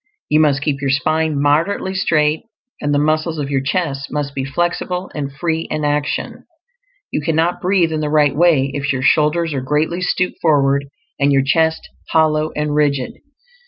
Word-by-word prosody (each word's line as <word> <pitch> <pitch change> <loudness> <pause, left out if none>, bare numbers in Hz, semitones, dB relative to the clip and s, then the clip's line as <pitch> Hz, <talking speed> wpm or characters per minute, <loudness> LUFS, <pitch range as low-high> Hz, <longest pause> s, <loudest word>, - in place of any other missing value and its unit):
You 155 - +3
must 145 -3 +2
keep 140 -3 -1
your 140 - -1
spine 155 +2 +1
moderately 160 +7 +1
straight, 155 -4 +1 0.4
and 145 - -1
the 145 - +2
muscles 155 +2 0
of 145 -1 -3
your 135 -1 +1
chest 140 -2 -2
must 145 -1 -3
be 135 - -3
flexible 175 +5 -2
and 140 -2 -4
free 160 +3 -2
in 155 -1 -2
action. 145 0 -2 0.7
You - - -1
cannot 165 +3 0
breathe 180 -3 +2
in 155 - -1
the 150 -1 -2
right 150 -2 +3
way 150 -5 +3
if 145 0 -1
your 130 -1 -2
shoulders 155 +3 +2
are 135 - -2
greatly 150 +6 -1
stooped 180 0 -1
forward 140 -3 +2 0.3
and 140 0 +3
your 135 -1 +3
chest 160 +3 +1 0.3
hollow 155 -1 +2
and 150 0 -1
rigid. 145 -3 0
150 Hz, 175 wpm, -18 LUFS, 140-160 Hz, 0.7 s, You